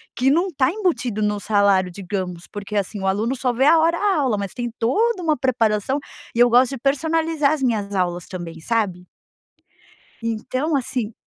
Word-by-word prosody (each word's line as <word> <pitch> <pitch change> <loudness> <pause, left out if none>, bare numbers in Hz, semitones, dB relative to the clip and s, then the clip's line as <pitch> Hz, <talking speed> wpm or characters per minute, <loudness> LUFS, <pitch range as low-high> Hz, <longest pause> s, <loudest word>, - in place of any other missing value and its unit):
Que 260 +2 +2
não 340 +7 +3
está 270 -4 +1
embutido 330 - -1
no 210 0 0
salário, 200 -3 +2
digamos. 180 -2 -5
Porque 205 0 -6
assim, 200 +1 -2
o 195 - -1
aluno 215 +7 0
só 255 0 0
vê 250 +3 +1
a 320 +2 +6
hora 335 +1 +2 0.2
aula, 255 -7 +1
mas 200 -2 -4
tem 240 -1 -3
toda 390 - +1
uma 310 -2 +2
preparação, 240 0 +1 0.4
e - - -1
eu 245 - +7
gosto 250 +2 +4
de 270 - -4
personalizar 305 +3 +1
as 290 - -3
minhas 210 -5 0
aulas 175 -2 -1
também, 170 -3 -7
sabe. 190 -5 -1 1.2
Então, 255 +7 -2
assim 245 -4 -2
235 Hz, 175 wpm, -21 LUFS, 200-280 Hz, 1.2 s, eu